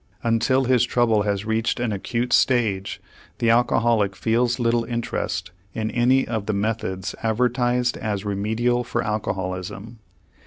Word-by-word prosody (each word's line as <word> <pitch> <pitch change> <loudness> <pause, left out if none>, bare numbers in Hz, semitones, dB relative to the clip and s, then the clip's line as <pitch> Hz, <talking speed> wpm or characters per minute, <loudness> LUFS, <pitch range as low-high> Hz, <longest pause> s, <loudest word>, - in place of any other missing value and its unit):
Until 120 +3 +2
his 125 -1 +3
trouble 120 -3 +2
has 100 0 -1
reached 110 +2 0
an 120 -2 -1
acute 115 +5 -2
stage, 110 -7 +2 0.4
the 115 -1 +2
alcoholic 115 -3 +2
feels 120 +2 +1
little 120 -1 +2
interest 115 -6 -3 0.2
in 110 0 -2
any 125 +2 +3
of 110 -3 -3
the 110 - 0
methods 100 -3 -2
advertised 125 +2 +1
as 105 -2 -3
remedial 110 +5 0
for - - -2
alcoholism. 100 +1 -4
115 Hz, 130 wpm, -23 LUFS, 105-120 Hz, 0.4 s, his